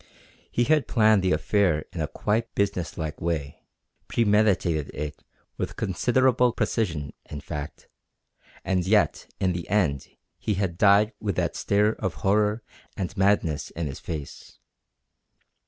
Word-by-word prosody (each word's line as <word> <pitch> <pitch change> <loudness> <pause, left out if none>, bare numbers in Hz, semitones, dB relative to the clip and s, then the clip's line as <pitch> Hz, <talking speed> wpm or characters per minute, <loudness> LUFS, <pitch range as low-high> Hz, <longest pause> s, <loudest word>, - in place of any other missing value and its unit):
He 120 - +2
had 155 +2 +2
planned 110 -4 +4
the 95 0 +1
affair 80 0 +2
in - - -3
a - - -1
quite 115 +2 -2
business 95 -5 -1
like 80 -2 -4
way. 80 -4 -3 0.5
Premeditated 105 -9 +2
it 75 0 -5 0.4
with - - -3
considerable 125 +5 +2
precision, 80 - -1 0.2
in 75 - -6
fact, 75 +1 -7 0.8
and 95 -1 +1
yet 105 0 +2
in 95 -1 +1
the 85 -1 -5
end 85 -10 +1 0.3
he 105 - -1
had 95 -3 -2
died 105 +1 +5
with 100 -4 -2
that - - -1
stare 105 +2 +2
of 95 -6 -4
horror 105 +3 +2 0.3
and 95 -4 -3
madness 95 -6 +1
in 85 - -4
his 70 -2 -5
face. 75 -4 -7
95 Hz, 140 wpm, -26 LUFS, 80-105 Hz, 0.8 s, died